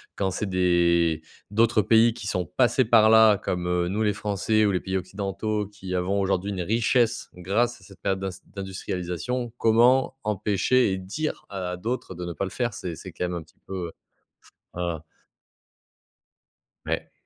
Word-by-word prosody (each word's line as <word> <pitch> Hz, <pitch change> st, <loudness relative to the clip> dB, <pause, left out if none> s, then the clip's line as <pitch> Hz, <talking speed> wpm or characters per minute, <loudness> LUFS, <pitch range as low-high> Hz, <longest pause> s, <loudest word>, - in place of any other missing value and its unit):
quand 95 Hz, -, 0 dB
c'est 95 Hz, +3 st, -3 dB
des 85 Hz, -3 st, +2 dB, 0.3 s
d'autres 115 Hz, +1 st, +3 dB
pays 115 Hz, +3 st, +5 dB
qui 110 Hz, -3 st, -7 dB
sont 90 Hz, -3 st, -1 dB
passés 120 Hz, +7 st, +2 dB
par 110 Hz, -1 st, +6 dB
là, 110 Hz, -2 st, +7 dB
comme, 90 Hz, -4 st, -2 dB
heu, 90 Hz, 0 st, +1 dB
nous 105 Hz, +4 st, -1 dB
les 105 Hz, -1 st, +2 dB
Français, 105 Hz, +1 st, +1 dB
ou 100 Hz, -, +2 dB
les 90 Hz, -, +1 dB
pays 95 Hz, +1 st, -4 dB
occidentaux 100 Hz, +3 st, -2 dB
qui 95 Hz, -3 st, -6 dB
avons 95 Hz, +3 st, 0 dB
aujourd'hui 95 Hz, +1 st, 0 dB
une 95 Hz, -2 st, -3 dB
richesse 115 Hz, +4 st, +1 dB
grâce 105 Hz, +7 st, -1 dB
à -, -, -18 dB
cette 100 Hz, -, -16 dB
période 95 Hz, 0 st, -1 dB
d'ins 95 Hz, 0 st, -2 dB, 0.3 s
d'industrialisation 95 Hz, +4 st, -4 dB
comment 120 Hz, +4 st, +4 dB
empêcher 105 Hz, +3 st, +2 dB
et 95 Hz, -, -1 dB
dire 135 Hz, +12 st, -4 dB
à 100 Hz, -, -7 dB
à -, -, -3 dB
d'autres, 115 Hz, +1 st, -4 dB
de 90 Hz, 0 st, -7 dB
ne 85 Hz, -, -4 dB
pas 90 Hz, -, -3 dB
le 95 Hz, -, -3 dB
faire? 120 Hz, -1 st, -2 dB
C'est 85 Hz, -3 st, -5 dB
c'est -, -, -9 dB
quand -, -, -5 dB
même 90 Hz, -, -3 dB
un -, -, -5 dB
petit 80 Hz, -, -20 dB
peu, 90 Hz, -3 st, -5 dB, 0.9 s
heu 85 Hz, -3 st, -2 dB, 1.9 s
Ouais. -, -, -3 dB
100 Hz, 175 wpm, -25 LUFS, 90-110 Hz, 1.9 s, là